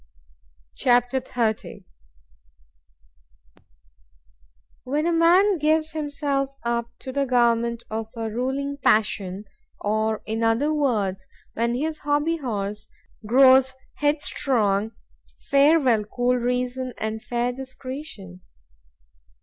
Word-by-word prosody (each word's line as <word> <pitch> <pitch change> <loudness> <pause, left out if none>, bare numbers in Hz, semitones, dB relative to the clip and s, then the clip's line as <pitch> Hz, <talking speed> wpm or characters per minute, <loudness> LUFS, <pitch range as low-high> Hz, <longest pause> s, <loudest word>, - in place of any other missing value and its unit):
C - - -3
H 240 - +8
A 245 - +5
P. 245 +2 -3
XXX 225 -3 -2 3.0
WHEN 290 +5 -1
a 340 - +1
man 350 +3 +4
gives 310 +1 +1
himself 285 -3 -2
up 235 0 -1
to 260 - -7
the 280 +1 -1
government 235 -1 +2
of 220 0 -4
a 225 -1 -3
ruling 270 +4 -2
passion,—or, 215 0 -1
in 220 +1 -3
other 230 +7 +2
words, 210 -10 -1 0.3
when 235 +1 0
his 310 +4 -2
HOBBY 295 +3 0
HORSE 210 -6 -4 0.4
grows 260 +2 +6 0.2
headstrong,——farewell 265 0 +1
cool 245 +3 0
reason 250 +1 -2
and 220 0 -4
fair 240 0 -1
discretion! 260 - -8
250 Hz, 100 wpm, -24 LUFS, 220-280 Hz, 3.0 s, H